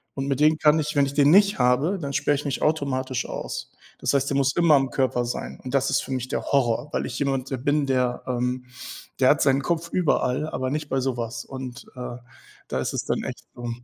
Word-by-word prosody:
und 135 0 -3
mit 140 0 0
dem 155 +1 +5
kann 150 0 +5
ich 150 -1 -2
wenn 140 - +4
ich 140 - -7
den 145 0 +5
nicht 200 +2 +5
habe, 125 +10 +2
dann 140 -4 -4
sperre 145 +1 +2
ich 145 +1 -5
mich 140 - -2
automatisch 135 -4 0
aus. - - -5 0.3
Das - - 0
heißt, 140 0 +2
der 140 - 0
muss 135 -1 +2
immer 170 -3 +5
am 135 -1 +1
Körper 130 -2 +1
sein. 120 - -5
Und 130 +1 -6
das 135 0 +2
ist - - +1
für - - -8
mich 130 -1 -2
der 130 - -2
Horror, 135 0 +1
weil - - -1
ich - - -5
jemand 135 -2 -1
de 135 - -1
bin, 145 +3 +1
der 125 -2 0
ähm, 125 0 -1 0.5
der 130 -1 +5
hat 150 - +4
seinen 135 0 +3
Kopf 170 +2 -1
überall, 150 -4 +1
aber 130 -4 -2
nicht 150 0 -3
bei 135 - +1
so 130 -1 -1
was. 115 0 -4
Und, 130 -2 -8
äh, 125 -1 -6 0.5
da 65 - -1
ist 65 - -2
es - - -2
dann - - -1
echt - - -6
so 120 0 -5
135 Hz, 245 wpm, -24 LUFS, 125-145 Hz, 0.5 s, dem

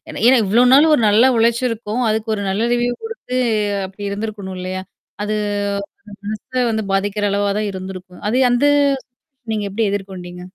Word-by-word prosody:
ஏன்னா - - -6 0.2
இவ்வளோ 225 +6 +4
நாள் 300 +4 +7
ஒரு 295 - +2
நல்ல 225 +6 +5
உழைச்சிருக்கும். 230 0 0
அதுக்கு 220 +1 -1
ஒரு 205 - -3
நல்ல 210 +4 0
ரிவ்யூ 240 0 +1
குடுத்து, 450 - -4 0.5
அப்படி 190 +2 -12
இருந்திருக்கணும் 200 -2 -5
இல்லையா? 185 +1 -4 0.4
அது 215 +1 -1 0.8
அந்த 200 - -11
மனச 230 +4 -2
வந்து 220 0 -1
பாதிக்கிற 205 +1 0
அளவா 200 0 +1
தான் 210 - -1
இருந்திருக்கும். 185 -1 -8
அது 245 - +1
வந்து 265 +4 +3 0.8
நீங்க 210 -1 -2
எப்படி 220 +2 0
எதிர்கொண்டீங்க? 185 -3 -6
210 Hz, 155 wpm, -19 LUFS, 195-235 Hz, 0.8 s, நாள்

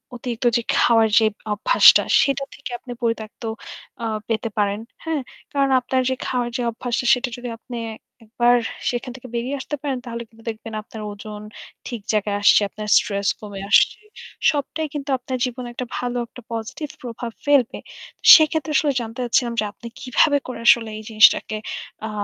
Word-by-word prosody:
অতিরিক্ত 245 0 -5
যে - - -1 0.2
খাওয়ার 225 -2 +4
যে 220 - +3 0.3
অভ্যাসটা 210 - +6 0.2
সেটা 275 -1 +1
থেকে 275 - -8
আপনি 250 - -10
পরিত্যক্ত 230 -1 -3 0.6
আ - - -1 0.2
পেতে 225 0 -1
পারেন? 205 0 +1 0.2
হ্যাঁ? 320 -3 -1 0.3
কারণ 275 -1 +2
আপনার 260 +1 0
যে 260 - 0
খাওয়ার 245 -1 -1
যে - - -2
অভ্যাসটা 245 +2 -3
সেটা 250 0 0
যদি 245 0 -6
আপনি 240 +1 -8 0.5
একবার 240 +2 +3 0.3
সেখান 250 +1 -3
থেকে 255 -1 -10
বেরিয়ে 255 +4 -2
আসতে 280 +3 -4
পারেন 280 -3 -2
তাহলে 235 -1 -5
কিন্তু 225 -1 -20
দেখবেন 225 0 -7
আপনার 220 0 -10
ওজন 210 +1 -9 0.5
ঠিক 235 -3 -5
জায়গায় 205 -1 0
আসছে। 205 - +6
আপনার 210 +1 -7
স্ট্রেস 200 -1 0
কমে 205 -2 -7
আসছে। - - +4 0.5
সবটাই 305 +2 -2
কিন্তু 290 -1 -5
আপনার 255 +1 -4
জীবনে 250 0 -5
একটা 250 +1 -4
ভালো, 245 0 -2
একটা 250 - -13
পজিটিভ 230 +7 -5
প্রভাব 240 -1 -6
ফেলবে। 280 -5 +3 0.6
সেক্ষেত্রে 315 -1 +2
আসলে 295 -1 +3
জানতে 225 +2 -7
চাচ্ছিলাম 240 0 +1
যে 215 - +1
আপনি 235 - -11
কিভাবে 285 +3 +3
করে 250 -2 -6
আসলে 225 -2 +6
এই 215 - -8
জিনিসটাকে 215 -1 +5 0.5
আ - - -6
240 Hz, 165 wpm, -22 LUFS, 225-260 Hz, 0.6 s, অভ্যাসটা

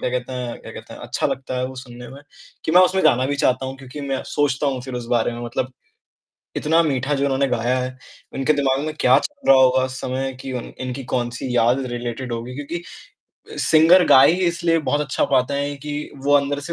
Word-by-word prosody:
क्या - - -1
कहते 125 0 -3
हैं 125 -2 -5
क्या - - -10
कहते - - -10
हैं, - - -12
अच्छा - - -2
लगता 130 -1 -4
है 125 - -1
वो 130 - -8
सुनने 125 -1 -10
में, 140 - -11 0.4
कि 160 - -1
मैं 180 - +8
उसमें 185 0 +2
गाना 130 -4 +4
भी 145 +1 -1
चाहता 130 -1 +1
हूँ 135 +1 -6
क्योंकि 135 +2 -9
मैं 135 -1 -3
सोचता 145 -1 0
हूँ 135 -2 -1
फ़िर 130 0 -7
उस 120 -1 -5
बारे 115 +1 0
में। 120 - -7
मतलब 125 +2 -3 0.8
इतना 160 +2 +2
मीठा 140 -2 -1
जो 140 - -1
उन्होंने 135 0 +1
गाया 125 +1 0
है, 130 0 -4 0.4
उनके 135 +3 +1
दिमाग 135 -2 +1
में 155 - -3
क्या 125 +1 +5
चल 290 -1 -5
रहा 135 - +8
होगा 130 0 +4
उस 130 0 -7
समय 130 +1 -2
कि 135 0 -6
उन 125 - -5
इनकी 130 +1 -5
कौन-सी 120 +1 -2
याद 120 +3 +3
रिलेटेड 120 +1 -5
होगी। 120 +2 -6
क्योंकि 145 +4 -5 0.8
अ, - - -9
सिंगर 165 +3 +5
गा 130 - +7
ही - - +6
इसलिए 170 -1 +1
बहुत 145 - +1
अच्छा 145 -2 0
पाता 130 +2 +2
है 140 +1 -2
कि 150 0 -4
वो 145 - +2
अंदर 140 0 0
से - - -2
130 Hz, 230 wpm, -21 LUFS, 125-145 Hz, 0.8 s, मैं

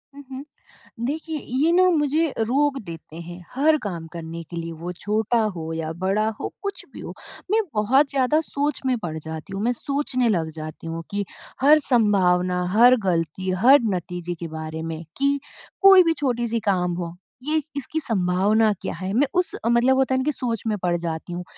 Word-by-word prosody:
हुँ, 285 - -10
हुँ। 265 +2 -6 0.6
देखिए 315 +3 -3
ये 275 +8 0
ना 365 +1 +5
मुझे 300 +2 +2
रोक 275 +5 +2
देते 165 -2 -10
हैं, 175 +1 -9
हर 305 +3 +4
काम 170 -5 -5
करने 165 0 -6
के 170 - -5
लिए 165 0 -4
वो 175 - -4
छोटा 215 +5 0 0.2
हो 160 -1 -5
या 160 -1 -3
बड़ा 210 +3 +2
हो - - -3
कुछ 400 -1 -5
भी - - -9
हो। - - -7 0.4
मैं 445 +1 +4
बहुत 265 +7 +3
ज़्यादा 280 +3 +2
सोच 290 -2 -2
में 255 -1 +2
पड़ 160 -2 -3
जाती 160 +4 -8
हूँ, 195 - -3
मैं 245 +2 +2
सोचने 255 -1 -1
लग 165 -6 0
जाती 155 +1 -7
हूँ 165 0 -4
कि 205 0 -1 0.4
हर 300 +3 +7
संभावना, 185 -8 +2
हर 245 +2 +8
गलती, 170 +1 -1
हर 245 +10 +6 0.2
नतीजे 175 0 -5
के 170 - -4
बारे 160 0 -6
में 165 0 -5
कि 280 +1 +2 0.4
कोई 385 -1 +9
भी 330 -1 +2
छोटी-सी 240 -5 0
काम 180 -2 +1
हो 170 0 -7 0.3
ये 305 +2 0 0.2
इसकी 290 +3 -3
संभावना 210 - +2
क्या - - -3
है? 185 +3 -5
मैं 270 +5 +3
उस 360 - 0
मतलब 240 +3 +4
होता 265 0 +2
है - - +2
ना - - 0
कि 300 - +1
सोच 240 -5 -3
में 215 -1 0
पड़ 180 -2 0
जाती 170 0 -5
हूँ। 180 +1 -4
215 Hz, 190 wpm, -23 LUFS, 175-275 Hz, 0.6 s, कोई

